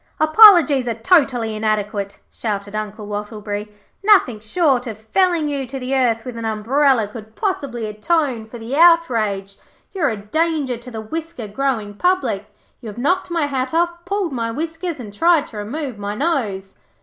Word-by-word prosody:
'Apologies 310 - +7
are 230 - -1
totally 245 - +2
inadequate,' 210 -2 -2
shouted 205 -2 -4
Uncle 215 0 -5
Wattleberry. 210 0 -5 0.3
'Nothing 385 - +4
short 255 +2 +1
of 220 -2 -6
felling 330 - +1
you 280 -3 -3
to 270 +2 -6
the 260 +1 -4
earth 235 -3 +1
with 250 -2 -6
an 230 - -5
umbrella 225 +2 +2
could 220 +1 -11
possibly 275 - -2
atone 230 +2 -1
for 240 - -9
the 230 +4 -5
outrage. 230 - +3 0.3
You 385 - -5
are - - +3
a 220 - -3
danger 290 +4 -1
to 240 +2 -11
the 225 -2 -6
whisker 320 0 -6
growing 220 -2 -2
public. 230 - 0 0.3
You 235 - -9
have 210 - -8
knocked 360 +10 0
my 335 -3 0
hat 265 0 -2
off, 345 0 0
pulled 390 -2 -1
my 230 -2 -2
whiskers, 325 +5 -4
and 210 -5 -8
tried 330 +5 +3
to 220 - -10
remove 245 +2 -5
my 205 0 -4
nose.' 210 - -2
245 Hz, 170 wpm, -20 LUFS, 215-315 Hz, 0.3 s, Apologies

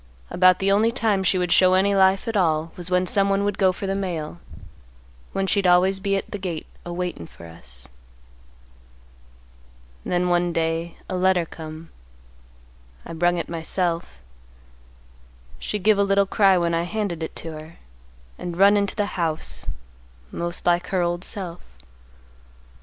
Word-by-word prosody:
About 185 0 +5
the 195 0 +1
only 215 +3 +3
time 215 -5 0
she 190 +1 +2
would 180 -1 -1
show 185 0 +5
any 200 +2 +3
life 190 +1 +3
at 225 - -2
all 165 -4 +1
was 175 -1 -4
when 180 0 +2
someone 195 +1 +1
would 205 -1 -2
go 190 -2 +4
for 185 - -6
the 195 - -1
mail, 175 -4 -4 0.9
when 195 - -1
she'd 195 0 +2
always 185 +2 +4
be 195 0 0
at - - -6
the 205 - -4
gate 175 -4 -4 0.2
a 175 - -7
waitin' 175 - -4
for 85 - -14
us. 65 -6 -10 2.2
"Then 180 0 0
one 175 -1 +1
day, 165 +1 -2
a 185 - -3
letter 180 -1 +2
come. 160 0 -10 1.1
I - - -7
brung 175 +2 +1
it 170 - -3
myself. 165 - -2 1.4
She 210 - -3
give 210 +1 +3
a - - +5
little 200 0 +3
cry 195 -1 +4
when 170 -1 0
I 165 - +1
handed 180 -2 -3
it 160 - -5
to 165 - -5
her, 155 +1 -10 0.6
and 175 -1 -5
run 200 +2 +6
into 200 -1 -1
the 205 - 0 0.2
house, 160 -2 -2 0.6
most 170 0 -3
like 175 0 +2
her 185 -2 0
old 175 +1 -2
self. 180 -5 -5
180 Hz, 160 wpm, -23 LUFS, 170-195 Hz, 2.2 s, run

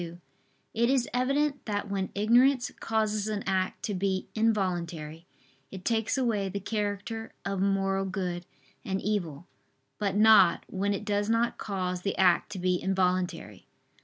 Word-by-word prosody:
2); 170 0 -7 0.5
it 235 +1 +2
is 260 -2 +2
evident 275 +2 +1
that 205 -1 -2
when 195 -1 -2
ignorance 245 +5 +4
causes 215 -2 0
an 210 -2 -2
act 190 -1 -1
to 210 - -2
be 190 0 -1
involuntary, 175 -7 -1 0.4
it 190 -1 -9
takes 225 +2 +1
away 220 -7 0
the 200 +2 -4
character 210 +2 -3
of 195 -1 -2
moral 195 0 +1
good 180 -2 -3 0.4
and 190 0 -2
evil; 175 -8 -2 0.5
but 200 -2 -1
not, 210 -4 +6
when 200 +1 -1
it 210 - -6
does 205 0 0
not 230 +1 +1
cause 185 -3 -3
the 200 - -2
act 185 +1 +3
to 200 - -5
be 180 0 0
involuntary. 180 - -1
200 Hz, 150 wpm, -28 LUFS, 185-220 Hz, 0.5 s, not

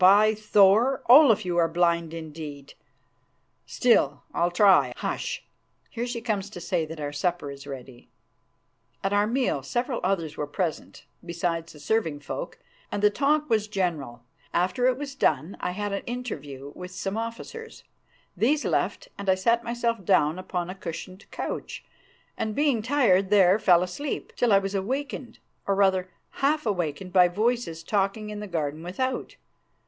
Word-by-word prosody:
By 205 +4 +7
Thor! 215 +4 +4
Olaf, 245 -5 +7
you 175 -1 -1
are 165 - +4
blind 170 -1 +1
indeed. 155 -3 -8 0.9
Still, 145 - +2
I'll 170 +1 +2
try. 190 +2 +5
Hush! - - -3 0.5
here 240 +1 -3
she 240 -1 -4
comes 205 -4 -2
to 185 - -9
say 175 -2 -1
that 160 0 -8
our 145 -1 -4
supper 160 -1 -1
is 140 0 -11
ready." 130 -3 -10 0.9
At 195 +1 0
our 205 +1 +3
meal 245 - 0
several 240 - -2
others 170 -5 -1
were 150 - -2
present, 160 +2 -4 0.2
besides 170 -1 -3
the 150 - -14
serving 155 -2 -1
folk, - - -6 0.3
and 205 - -3
the 210 - +6
talk 295 +5 +1
was 215 -4 +1
general. 160 - -3 0.3
After 185 +8 +2
it 255 -1 +2
was 280 0 -5
done 160 - 0
I - - -2
had 205 +2 -3
an 200 - -2
interview 145 - -6
with 180 0 -8
some 195 +2 -4
officers. 230 - -6 0.5
These 290 +6 +2
left, - - -1
and 200 - -3
I 190 - +5
sat 230 +5 +2
myself 235 -2 -1
down 155 0 +3
upon 180 -1 -3
a - - -5
cushioned 185 +1 -8
couch, - - -5 0.5
and, 215 -1 -2
being 285 -6 +2
tired, 215 -7 +3
there 195 -1 +5
fell 180 -4 +5
asleep, 270 +11 -5
till 240 -2 +2
I 200 - +7
was 195 0 -1
awakened, 250 +6 -3 0.3
or, 200 - +2
rather, 190 -2 +2 0.3
half 300 +1 +2
awakened 180 -3 -2
by 180 -2 +7
voices 210 -3 -1
talking 205 +3 -1
in 210 - -6
the 210 - -6
garden 155 -4 -3
without. 255 +10 -3
195 Hz, 160 wpm, -26 LUFS, 170-230 Hz, 0.9 s, By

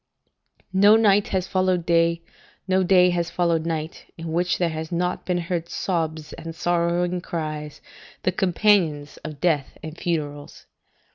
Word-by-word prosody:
["No 200 +3 +6
night 205 -2 +4
has 185 -2 -1
followed 185 -2 0
day, 170 0 +2 0.4
no 190 0 +3
day 180 -1 +5
has 170 -1 -1
followed 170 -2 0
night, 160 -1 -5
in 165 -1 -6
which 175 +2 +1
there 175 -2 +1
has 160 +1 -5
not 180 +1 -2
been 180 -1 +1
heard 170 -1 -3
sobs 160 -4 -3
and 165 -1 -8
sorrowing 175 +1 0
cries, 155 -4 -5 0.4
the 185 - +2
companions 180 -5 +1
of 155 -2 -8
death 150 -4 0
and 155 0 -7
funerals." 145 -4 -4
170 Hz, 145 wpm, -23 LUFS, 160-180 Hz, 0.4 s, No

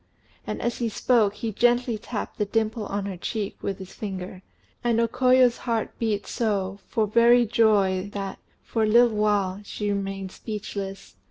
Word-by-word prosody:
and - - -3
as 240 -1 -1
he 235 -2 0
spoke, 215 -1 +2
he 225 0 -3
gently 240 +2 +2
tapped 215 +1 -6
the 210 - +2
dimple 220 +1 -1
on 200 0 -3
her 195 -2 -5
cheek 205 +2 -3
with 195 -1 -3
his 190 -1 -10
finger; 185 -2 -6 0.4
and 235 -1 +2
O 230 - +3
Koyo's 255 0 +4
heart 230 -2 -2
beat 215 -3 -1
so, 200 -4 -1
for 220 -3 +1
very 235 +3 +5
joy, 205 -4 +2
that, 195 -1 -4 0.2
for 225 - -2
a 215 - +3
little 235 +1 +5
while, 205 -2 +1
she 205 0 -3
remained 195 -1 -3
speechless. 200 -3 -6
210 Hz, 170 wpm, -25 LUFS, 195-230 Hz, 0.4 s, very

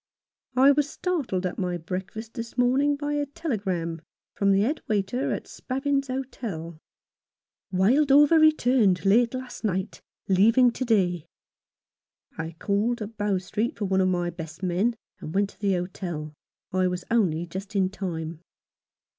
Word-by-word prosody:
I 265 +2 +7
was 290 0 +1
startled 280 - -2
at 180 - -3
my 180 -2 -1
breakfast 190 +6 -6
this 230 -1 -7
morning 265 +4 +3
by 290 +1 -3
a 290 -1 -1
telegram 190 - -3 0.3
from 200 -1 +2
the 195 0 +4
head 285 +9 0
waiter 215 +5 0
at - - -3
Spavins's 275 +1 -2
Hotel: 220 -11 -5 0.5
— - - -62
"Wildover 280 - +5
returned 245 -11 +4
late 230 +5 +4
last 255 -1 -7
night. 190 -1 -2 0.3
Leaving 230 +6 +5
to 255 - -3
day." 180 -8 +1 1.1
I 165 0 -5
called 215 +5 0
at 215 +2 -9
Bow 205 -2 0
Street 210 +8 -2
for 205 - -2
one 190 0 +2
of 185 - +3
my 175 -1 0
best 165 +1 -9
men, 190 +7 +1 0.2
and 155 - -7
went 200 0 +1
to - - -25
the 200 -2 +1
hotel. 175 -4 -4 0.4
I 185 0 +2
was 180 0 -3
only 175 -8 +2
just 195 +4 -7
in 190 -1 +2
time. 165 -5 -5
200 Hz, 155 wpm, -26 LUFS, 180-255 Hz, 1.1 s, I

